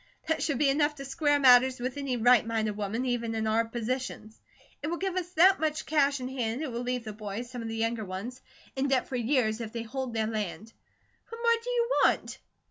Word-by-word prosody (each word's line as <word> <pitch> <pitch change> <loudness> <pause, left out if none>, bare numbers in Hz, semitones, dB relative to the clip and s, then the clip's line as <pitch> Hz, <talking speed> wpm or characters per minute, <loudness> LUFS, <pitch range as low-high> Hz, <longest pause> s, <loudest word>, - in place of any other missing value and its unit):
That 320 - 0
should 285 -5 0
be 280 0 +3
enough 295 +1 +1
to 275 -1 -8
square 290 +1 +1
matters 255 -1 +6
with 250 +1 -3
any 275 -3 -2
right 245 0 +5
minded 220 -2 -1
woman, 210 +4 -2
even 235 -2 -1
in 220 0 -1
our 220 +1 +2
positions. 235 -1 -5 0.4
It 290 - -3
will 340 +2 -2
give 380 0 -2
us 360 -2 -2
that 370 +4 +6
much 310 -1 -1
cash 285 -2 +2
in 250 - -4
hand, 250 +1 -3
it 285 - -4
will 235 +1 -3
leave 250 -1 -2
the 215 -1 -6
boys, 215 +3 -6
some 245 -2 -6
of 230 - -5
the 225 - -4
younger 225 0 -1
ones, 210 +7 -6 0.3
in 270 +1 0
debt 265 -2 +1
for 260 - -5
years, 240 -2 +1
if 220 -1 -6
they 230 -1 -3
hold 255 0 -5
their 220 -1 +1
land. 215 0 -4 0.6
What 460 0 -8
more 465 -1 +2
do - - -5
you 480 -1 +1 0.2
want?" - - 0
250 Hz, 230 wpm, -28 LUFS, 225-285 Hz, 0.6 s, matters